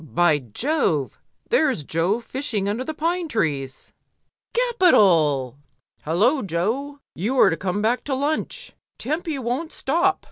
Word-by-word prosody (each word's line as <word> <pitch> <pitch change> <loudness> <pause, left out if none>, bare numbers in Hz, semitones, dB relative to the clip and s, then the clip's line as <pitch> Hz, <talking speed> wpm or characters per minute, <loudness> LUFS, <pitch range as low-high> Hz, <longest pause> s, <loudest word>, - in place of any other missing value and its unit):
By 160 -1 +2
Jove! 155 - -1 0.3
there's 275 - +2
Jo 170 - 0
fishing 240 -5 -3
under 215 +5 -1
the 315 +3 -5
pine 340 +3 -1
trees! 145 - -3 0.6
Capital! 180 - +3 0.5
HuUoa, 220 - +2
Jo, 240 - -2
you 225 +10 -2
are - - +6
to - - 0
come 190 +3 -2
back 235 +3 +1
to 275 - -1
lunch. 310 - -3 0.2
Tempy 310 +3 -3
won't 260 +6 -3
stop. 345 +7 +1
240 Hz, 130 wpm, -23 LUFS, -, 0.6 s, are